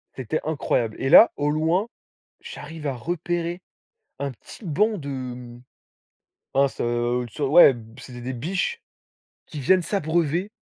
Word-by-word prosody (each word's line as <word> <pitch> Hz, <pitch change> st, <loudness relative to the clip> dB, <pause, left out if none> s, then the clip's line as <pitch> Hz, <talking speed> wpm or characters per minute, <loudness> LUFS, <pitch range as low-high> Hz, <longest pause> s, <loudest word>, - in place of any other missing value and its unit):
c'était 130 Hz, +4 st, -2 dB
incroyable. 125 Hz, -7 st, -1 dB
Et 135 Hz, -, 0 dB
là, 230 Hz, -, +9 dB
au 145 Hz, 0 st, 0 dB
loin, 165 Hz, +8 st, +1 dB, 0.5 s
j'arrive 160 Hz, -2 st, -8 dB
à 135 Hz, -, -2 dB
repérer 175 Hz, +4 st, -3 dB, 0.6 s
un 140 Hz, -1 st, -3 dB
petit 130 Hz, -, -14 dB
banc 210 Hz, +6 st, +1 dB
de 125 Hz, -4 st, -7 dB, 0.9 s
mince, 140 Hz, 0 st, +1 dB
heu, 120 Hz, +1 st, 0 dB
une 120 Hz, -, -9 dB
sorte 140 Hz, +4 st, -2 dB
ouais, 150 Hz, -5 st, +8 dB, 0.2 s
c'était 125 Hz, -2 st, -10 dB
des 130 Hz, +2 st, -4 dB
biches 185 Hz, -, -2 dB, 0.7 s
qui 150 Hz, -, -7 dB
viennent 185 Hz, +7 st, +3 dB
s'abreuver. 170 Hz, 0 st, 0 dB
145 Hz, 135 wpm, -24 LUFS, 125-175 Hz, 0.9 s, là